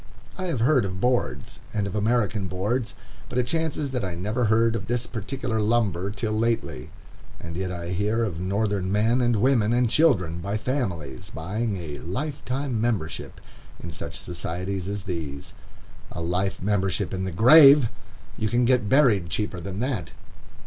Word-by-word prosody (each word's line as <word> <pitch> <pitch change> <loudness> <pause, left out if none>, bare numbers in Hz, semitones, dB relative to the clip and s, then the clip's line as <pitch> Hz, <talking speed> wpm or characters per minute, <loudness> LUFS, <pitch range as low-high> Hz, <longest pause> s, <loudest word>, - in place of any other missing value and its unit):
I 185 - -4
have 155 -10 -1
heard 130 +1 +4
of 95 -2 -4
boards, 125 +3 -1 0.2
and 105 -1 0
of 100 - -4
American 105 -2 +1
boards, 105 +5 -2 0.3
but 125 - -4
it 125 - +2
chances 155 0 -1
that 125 -4 -2
I 90 -3 -3
never 105 +7 -1
heard 115 +1 +3
of - - -4
this 120 0 -1
particular 120 +1 -3
lumber 105 -4 +1
till 110 +1 -3
lately. 110 - -1 0.5
And 85 -1 -7
yet 90 +1 -2
I 85 -1 -5
hear 105 +5 0
of 90 -8 -3
Northern 100 0 -1
men, 110 +5 +2
and 120 -1 +2
women, 115 -1 +3
and 125 0 +3
children, 95 - +3
by 100 +5 -2
families, 90 - -3
buying 100 +6 -3
a 75 -5 -6
"life 135 - -4
membership" 120 - -2 0.4
in 85 - -7
such 80 - -6
societies 90 +2 -4
as 100 0 -4
these. 80 -7 -5 0.6
A - - -6
life 90 +3 -1
membership 95 -2 0
in 95 0 -2
the 95 - -2
grave! 140 - +8 0.5
You 110 - 0
can 120 +2 +2
get 125 -4 +2
buried 110 - +4
cheaper 100 0 -2
than 95 +4 -5
that. 125 - -2
105 Hz, 165 wpm, -25 LUFS, 90-120 Hz, 0.6 s, grave